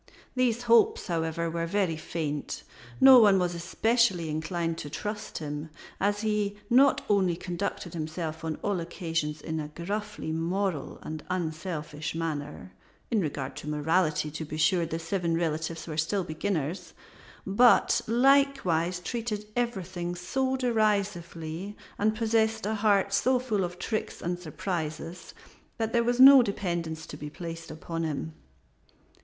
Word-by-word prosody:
These 245 -2 +1
hopes, 235 -1 +4
however, 165 -1 -1
were 165 0 -2
very 185 -2 +1
faint. 155 -2 -4 0.4
No 265 -1 +10
one 205 -4 +6
was 180 -1 0
especially 185 0 +1
inclined 165 +1 -2
to 145 - -6
trust 210 +7 -5
him, 150 0 -5 0.3
as 205 +1 +1
he 210 -2 0 0.2
not 270 +3 +5
only 190 -4 +3
conducted 175 0 -4
himself 160 0 -4
on 160 -1 -2
all 200 -3 0
occasions 165 -3 -3
in 160 +1 -3
a 150 - -4
gruffly 200 +3 -4
moral 170 -1 -2
and 155 -1 -6
unselfish 160 -3 -3
manner 150 - -4 0.4
in 220 -3 +3
regard 140 -4 -3
to 150 - -6
morality, 155 0 +1
to 155 +2 -5
be 155 0 -6
sure, 170 +1 +3
the 165 - -3
seven 165 0 -1
relatives 165 0 -2
were 155 -2 -6
still 185 +5 0
beginners 165 0 -3 0.5
but 205 +3 +5
likewise 235 - +3
treated 220 0 -3
everything 185 -7 -2
so 260 +9 -1
derisively 200 -6 -1 0.2
and 215 +1 +2
possessed 220 -1 +1
a 215 - 0
heart 205 -2 +2
so 255 +5 +3
full 225 -6 -1
of 175 0 -4
tricks 215 +4 -3
and 175 +1 -3
surprises 165 0 -5 0.4
that 225 -1 -2
there 235 -1 +3
was 240 +1 0
no 270 0 +10
dependence 170 -7 -3
to 150 - -9
be 150 0 -6
placed 165 +1 -7
upon 165 +1 -5
him. 160 0 -3
175 Hz, 140 wpm, -28 LUFS, 160-210 Hz, 0.5 s, No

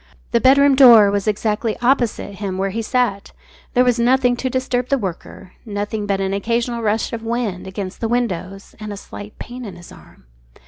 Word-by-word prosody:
The 235 - +2
bedroom 280 +2 +5
door 235 -7 +8
was 200 +1 -2
exactly 215 +1 -1
opposite 240 -5 0
him 190 -2 -3
where 195 0 -1
he 225 +3 -3
sat. 225 -4 -1 0.4
There 250 - +5
was 245 -1 +1
nothing 245 +1 +3
to 260 - -2
disturb 255 -1 -2
the 275 - +2
worker, 185 -3 -7
nothing 205 0 -4
but 200 -1 0
an 195 0 -1
occasional 235 +3 -1
rush 220 +1 -1
of 230 - -4
wind 225 -6 -3
against 190 0 -6
the 225 - 0
windows, 195 -5 -3
and 215 -1 -6
a 205 - -6
slight 205 +1 -10
pain 250 +1 -8
in 200 -6 -8
his 175 0 -13
arm. - - -17
225 Hz, 190 wpm, -19 LUFS, 200-245 Hz, 0.4 s, door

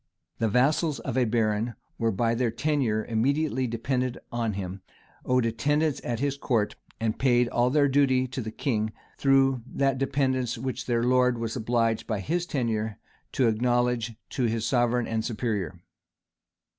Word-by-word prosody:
The 115 - +2
vassals 145 - +2
of 130 - -4
a 130 -1 +3
baron 110 0 0 0.2
were 115 -1 +2
by 115 +3 +1
their 120 0 +1
tenure 120 -4 0
immediately 130 +3 +1
dependent 125 +2 -1
on 115 -2 -1
him, 95 0 -5 0.4
owed 125 -1 +2
attendance 145 +6 +1
at 120 -2 -2
his 140 +1 -1
court, 115 -7 0 0.2
and 110 -1 -1
paid 125 -2 +3
all 120 +1 +2
their 145 +1 +4
duty 135 -2 +3
to 130 - -4
the 110 - -4
king, 110 -2 -1 0.3
through 135 -2 +3
that 135 0 0
dependence 130 -3 0
which 130 +1 -4
their 120 -1 +1
lord 125 0 +3
was 115 -1 -3
obliged 115 -1 0
by 110 -3 -1
his 175 - -1
tenure 110 -6 -1 0.4
to 130 - +3
acknowledge 120 0 +1 0.2
to 130 - 0
his 115 -1 0
sovereign 120 0 +2
and 110 -1 -1
superior. 105 - -2
120 Hz, 155 wpm, -27 LUFS, 115-130 Hz, 0.4 s, their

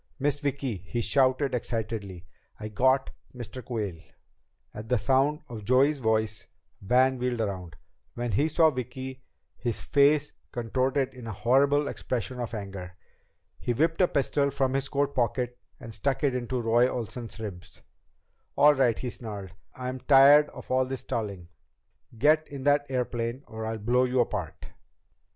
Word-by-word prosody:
"Miss 145 +1 0
Vicki," 140 -5 -2
he 95 +7 -5
shouted 130 +4 +2
excitedly, 110 -6 -4 0.3
"I 110 0 -5
got 130 +5 +2 0.2
Mr. 120 +1 -7
Quayle!" 105 -9 -4 0.7
At 110 +1 -8
the 125 - +3
sound 135 +5 +2
of 110 -3 -8
Joey's 135 +6 +3
voice 110 -2 0 0.3
Van 130 +5 +3
wheeled 125 -1 -1
around. 95 -7 -3 0.4
When 120 -1 -2
he 145 +10 +2
saw 160 0 +4
Vicki, 130 0 -6 0.4
his 120 -3 -3
face 145 +1 +3 0.2
contorted 130 +3 0
in 125 -3 -10
a - - -3
horrible 140 +7 +3
expression 125 -1 -4
of 120 -1 -4
anger. 95 -3 -7 0.6
He 120 - -1
whipped 160 +8 +1
a 180 - +5
pistol 140 -1 +1
from 135 -1 0
his 135 0 -1
coat 140 0 0
pocket 125 -1 -1 0.2
and 115 -2 -9
stuck 135 +8 -1
it 140 -3 +3
in 125 -1 -2
Roy 120 -1 +2
Olsen's 120 -1 -6
ribs. 95 -4 -8 0.7
"All 150 +1 +7
right," 130 -5 +2
he 125 - -4
snarled, 100 -6 -8 0.2
"I'm 130 0 -4
tired 145 +2 +7
of - - -11
all 130 0 +3
this 130 0 -5
stalling! 100 -6 -4 0.7
Get 155 +5 +4
in 140 -2 -8
that 145 0 +3
airplane 125 0 -2
or 110 0 -6
I'll 110 0 -3
blow 120 +4 +2
you 125 0 0
apart!" 100 -8 -4
125 Hz, 155 wpm, -27 LUFS, 110-135 Hz, 0.7 s, All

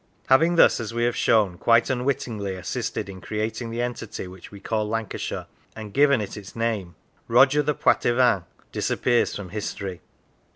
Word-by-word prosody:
Having 165 +6 +5
thus, 165 - +5
as 115 0 -5
we 120 - 0
have 120 0 +1
shown, 100 -6 +2
quite 115 +1 +4
unwittingly 120 -6 -2
assisted 90 +1 -4
in 95 -2 -9
creating 110 +2 -3
the 115 +1 -2
entity 120 -5 -5
which 90 0 -12
we 100 - -10
call 105 +1 -2
Lancashire, 115 -1 -3 0.3
and 110 -2 -8
given 140 -3 +4
it 100 - -6
its 100 -2 -10
name, 110 -7 -2 0.3
Roger 135 +5 +5
the 150 0 -1
Poitevin 120 -9 +3 0.3
disappears 120 -2 +1
from 100 -3 -6
history. 100 -2 -5
115 Hz, 160 wpm, -24 LUFS, 100-125 Hz, 0.3 s, Having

